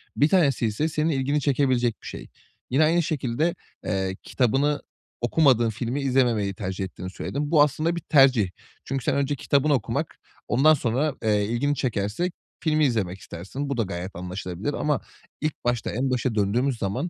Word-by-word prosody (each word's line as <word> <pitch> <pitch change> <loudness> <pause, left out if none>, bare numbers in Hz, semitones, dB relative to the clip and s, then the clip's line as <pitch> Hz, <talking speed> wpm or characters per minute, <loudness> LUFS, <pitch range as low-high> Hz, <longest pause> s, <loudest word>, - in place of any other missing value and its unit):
1 145 - +4
tanesi 145 -10 +3
ise 110 +9 0
senin 155 +1 0
ilgini 140 0 0
çekebilecek 130 -4 +2
bir - - -10
şey. - - -7 0.4
Yine 135 +5 +3
aynı 170 +2 +3
şekilde, 150 +3 -1 0.3
eee, 95 -1 -1
kitabını 135 +4 +1 0.4
okumadığın 120 -2 +4
filmi 120 +5 -3
izlememeyi 120 -7 +2
tercih 95 0 -4
ettiğini 90 0 -7
söyledin. 145 +9 -4
Bu 155 -3 +6
aslında 155 +4 0
bir 170 - -2
tercih. 130 - +4 0.4
Çünkü 135 -1 -3
sen - - +1
önce 140 +1 0
kitabını 145 +2 +2
okumak, 120 -7 -1 0.3
ondan 145 +6 +5
sonra, 135 +2 0
eee, 105 -2 +2
ilgini 120 +7 0
çekerse 120 - -1 0.3
filmi 155 -2 +3
izlemek 95 -7 -1
istersin. 100 +14 -6
Bu 140 - -2
da 115 - +2
gayet 90 0 -6
anlaşılabilir 90 +7 -4
ama 150 -2 0 0.4
ilk 155 0 0
başta 120 -1 0
en 130 +5 -1
başa 125 -2 0
döndüğümüz 120 +6 +1
zaman, 120 - -2
130 Hz, 165 wpm, -25 LUFS, 105-145 Hz, 0.4 s, Bu